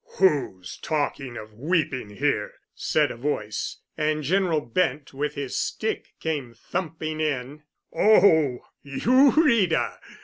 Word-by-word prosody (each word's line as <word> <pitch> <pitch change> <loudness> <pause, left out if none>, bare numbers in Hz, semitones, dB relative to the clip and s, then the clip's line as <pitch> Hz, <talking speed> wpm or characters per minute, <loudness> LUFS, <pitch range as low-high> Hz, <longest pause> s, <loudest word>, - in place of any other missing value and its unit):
"Who's 120 - +1
talking 145 -4 -2
of 110 0 -9
weeping 140 - -1
here?" 105 -1 -1 0.2
said 150 -2 +1
a - - -6
voice. 115 -5 -3
And 155 0 0
General 175 +1 +2
Bent, 140 +1 -1
with 145 +2 -3
his 140 -3 -4
stick, 220 - -3
came 145 -7 -3
thumping 160 +3 -4
in. 145 -1 -2 0.3
"Oh—you, 200 - +4
Rita?" 235 - +2
150 Hz, 110 wpm, -25 LUFS, 130-165 Hz, 0.3 s, Oh—you